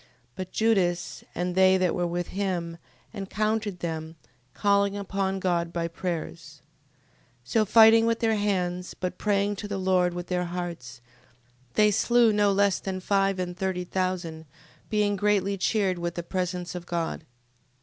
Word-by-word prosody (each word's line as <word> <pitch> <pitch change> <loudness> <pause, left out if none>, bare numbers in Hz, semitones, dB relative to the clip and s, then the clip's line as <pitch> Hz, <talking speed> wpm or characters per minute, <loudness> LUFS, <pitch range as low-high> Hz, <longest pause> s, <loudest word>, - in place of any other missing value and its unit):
15:26. - - -29 0.3
But 185 0 -6
Judas, 185 -6 0
and 180 +1 -1
they 190 0 +5
that 185 -2 +1
were 175 -2 0
with 175 0 -3
him, 175 -4 -3 0.3
encountered 210 -1 -2
them, 160 -1 -4 0.4
calling 200 0 +2
upon 195 -1 -2
God 170 -2 0
by 170 -1 -2
prayers: 170 -1 -6 0.8
15:27. - - -14
So 220 -2 +3
fighting 225 +2 +7
with 230 0 +1
their 225 -1 +2
hands, 180 -3 -1
but 180 0 -4
praying 205 0 +1
to 205 - -5
the 200 -1 -3
Lord 185 -2 +2
with 175 0 -4
their 180 0 -1
hearts, 170 -9 -6 0.7
they 210 0 +5
slew 235 +2 +4
no 205 -1 +3
less 200 -1 +2
than 190 -1 -4
five 195 0 +1
and 180 -1 -3
thirty 185 -1 -2
thousand, 180 -3 -3 0.4
being 210 -1 +1
greatly 200 0 +1
cheered 195 -2 0
with 170 0 -3
the 175 - -4
presence 180 0 -3
of 175 -1 -7
God. 170 -1 -3
185 Hz, 160 wpm, -26 LUFS, 175-200 Hz, 0.8 s, fighting